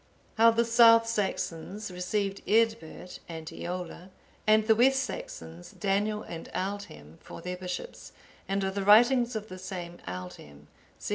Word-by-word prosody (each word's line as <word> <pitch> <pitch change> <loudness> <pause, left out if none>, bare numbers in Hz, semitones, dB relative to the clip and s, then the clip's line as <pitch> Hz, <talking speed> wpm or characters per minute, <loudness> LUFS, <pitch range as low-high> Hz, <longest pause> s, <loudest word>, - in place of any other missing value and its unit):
How 230 +1 +6
the 230 +1 +2
South 230 0 +6
Saxons 205 -2 -3
received 195 +2 -2
Eadbert 220 -5 0
and 160 -1 -7
Eolla, 180 +2 -6 0.4
and 215 0 +5
the 220 - +5
West 265 +4 +3
Saxons, 85 - -8
Daniel 210 +1 -1
and 165 -1 -8
Aldhelm, 185 - -5
for - - -11
their 180 +2 -5
bishops; 180 - -7 0.4
and 195 0 -1
of 190 0 -1
the 200 0 -2
writings 240 +4 +5
of 215 0 -4
the 185 -2 -9
same 175 -2 -7
Aldhelm. 85 -5 -8
195 Hz, 140 wpm, -28 LUFS, 175-225 Hz, 0.4 s, How